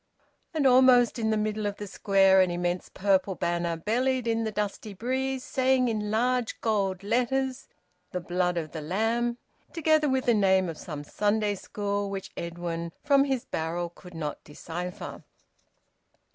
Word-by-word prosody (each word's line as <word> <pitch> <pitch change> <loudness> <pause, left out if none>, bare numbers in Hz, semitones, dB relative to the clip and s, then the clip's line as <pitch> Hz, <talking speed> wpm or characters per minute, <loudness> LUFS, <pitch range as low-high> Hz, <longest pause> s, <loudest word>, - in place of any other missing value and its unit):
And 310 -4 0
almost 250 -2 +6
in 220 -1 0
the 220 - +2
middle 215 0 -1
of 200 - -3
the 205 - -5
Square 195 -1 +4
an 185 - +3
immense 175 +1 -2
purple 190 -1 +1
banner 170 -1 -1
bellied 250 +7 0
in 225 0 +1
the 220 - -2
dusty 210 0 -4
breeze, 260 +4 -2
saying 260 -1 +2
in 210 -2 -2
large 245 +2 0
gold 195 -4 0
letters, 255 +4 0 0.4
"The 180 - -3
Blood 180 0 -1
of 155 -2 -3
the 160 - -5
Lamb," 225 +8 0 0.3
together 310 -2 +2
with 265 -1 0
the 240 - +4
name 190 -3 +3
of 160 - -7
some 150 -3 -6
Sunday 210 +5 0
school, 205 0 -3
which 195 -1 -5
Edwin 170 -1 -4
from 280 -1 +4
his 265 -3 -1
barrel 170 +2 -3
could 180 0 -14
not 150 -2 -4
decipher. 170 +4 -7
205 Hz, 160 wpm, -27 LUFS, 180-245 Hz, 0.4 s, almost